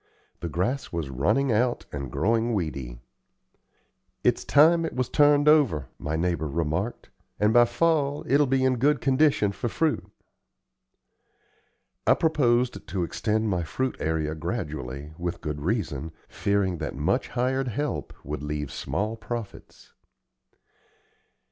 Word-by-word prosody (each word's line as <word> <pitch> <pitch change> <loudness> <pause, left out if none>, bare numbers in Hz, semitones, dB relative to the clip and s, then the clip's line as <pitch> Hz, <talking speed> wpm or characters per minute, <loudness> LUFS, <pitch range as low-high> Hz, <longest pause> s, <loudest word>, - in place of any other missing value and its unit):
The 85 - -4
grass 100 - -2
was 80 -5 -3
running 105 - +1
out 120 +3 +1
and 70 -3 -5
growing 115 - +1
weedy. 65 -9 -4 1.2
"It's - - +2
time 165 +3 +5
it 165 - -4
was 125 -1 -1
turned 145 0 +4
over," 125 - +4
my 75 +2 -3
neighbor 85 -1 0
remarked; 85 - -2 0.3
"and 105 +1 +3
by 120 0 +7
fall 145 +3 +1
it'll 140 +1 +3
be 130 0 +2
in 130 -1 +2
good 145 +3 +3
condition 135 -5 +3
for 120 +4 -3
fruit." 125 - -1 2.0
I - - +6
proposed 125 -6 +1
to 95 -3 -2
extend 110 +5 -1
my 90 -4 0
fruit 130 +11 -2
area 80 -1 -1
gradually, 75 - -5
with 85 0 -3
good 75 -1 -4
reason, 80 - -2
fearing 100 -4 0
that 75 -3 -4
much - - 0
hired 130 +2 -1
help 145 +6 -3
would - - -5
leave 75 -2 -4
small 105 - -2
profits. 115 -2 -8
105 Hz, 130 wpm, -26 LUFS, 80-130 Hz, 2.0 s, by